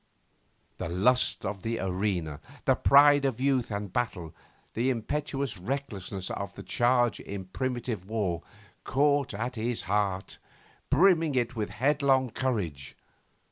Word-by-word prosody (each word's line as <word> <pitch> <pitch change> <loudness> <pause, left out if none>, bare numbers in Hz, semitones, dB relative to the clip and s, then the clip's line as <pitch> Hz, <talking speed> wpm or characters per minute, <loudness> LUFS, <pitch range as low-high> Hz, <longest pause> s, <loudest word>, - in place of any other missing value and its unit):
The - - -3
lust 105 +9 +2
of 100 0 -3
the 115 +2 -2
arena, 90 -5 -2 0.3
the - - +5
pride 145 0 +6
of 130 -4 0
youth 130 -2 +1
and 100 -3 -4
battle, 90 -10 -2 0.4
the 120 +4 +1
impetuous 135 -1 -2
recklessness 100 -5 -4
of 100 -1 -5
the - - -8
charge 120 -1 +2
in 100 -2 -6
primitive 120 -2 -3
war 95 -7 -1 0.4
caught 140 -3 +2
at 120 +3 -3
his 115 +1 -1
heart, 95 +1 -1 0.5
brimming 165 -2 +4
it 125 0 0
with 105 -2 -2
headlong 135 0 +2
courage. 95 - -3
115 Hz, 130 wpm, -28 LUFS, 100-135 Hz, 0.5 s, pride